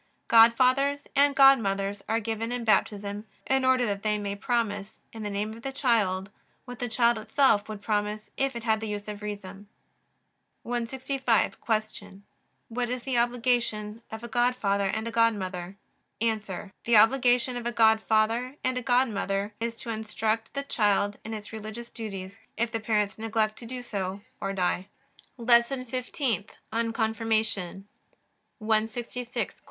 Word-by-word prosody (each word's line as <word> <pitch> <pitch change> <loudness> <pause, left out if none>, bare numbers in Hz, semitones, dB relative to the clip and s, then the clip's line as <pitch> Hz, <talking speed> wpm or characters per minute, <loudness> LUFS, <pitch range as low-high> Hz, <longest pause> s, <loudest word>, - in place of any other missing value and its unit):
Godfathers 255 +5 +5
and 280 0 +4
godmothers 205 -7 +4
are 225 - +2
given 225 +1 -3
in 245 -1 -2
Baptism 205 -1 0 0.2
in 265 0 +2
order 260 -1 +4
that 200 -3 -2
they 210 0 +1
may 200 -1 -3
promise, 210 -2 -2 0.2
in 225 - -7
the 210 - -3
name 205 +2 -2
of 230 - -11
the 270 - -4
child, 210 -8 +1 0.3
what 245 -2 -9
the 245 - -2
child 235 0 +3
itself 220 -2 +2
would 210 -1 -7
promise 210 0 -2
if 270 -1 0
it 235 - -5
had 220 -2 +2
the 220 - -4
use 205 0 -4
of 210 0 -6
reason. 205 -1 -7 1.0
165. 245 0 0 0.4
Q. 195 +1 -11 0.4
What 240 +1 -2
is 250 -1 -3
the 260 -3 +1
obligation 235 -3 0
of 220 +1 -7
a - - -5
godfather 235 -5 +1
and 220 +3 -2
a - - -3
godmother? 200 -5 0 0.4
A. 215 -4 -2
The 235 -2 +5
obligation 245 +2 +4
of 240 -1 -3
a - - 0
godfather 225 +2 +3
and 255 -1 0
a - - -6
godmother 215 -5 +1
is 230 0 -2
to 235 - -4
instruct 220 +1 -2
the 280 - -1
child 205 -5 +1
in 220 0 -5
its 210 +1 -9
religious 220 +2 -7
duties, 200 -3 -7 0.2
if 235 0 0
the 225 - -1
parents 210 -2 0
neglect 220 -1 0
to 235 - -9
do 250 +1 -6
so 195 -3 -4 0.2
or 195 - -2
die. 185 0 0 0.5
LESSON 240 +2 +3
FIFTEENTH 250 -3 -2 0.2
ON 230 0 0
CONFIRMATION 220 -4 -1 0.7
166. 225 +2 -2
Q. - - -28
225 Hz, 155 wpm, -27 LUFS, 210-245 Hz, 1.0 s, Godfathers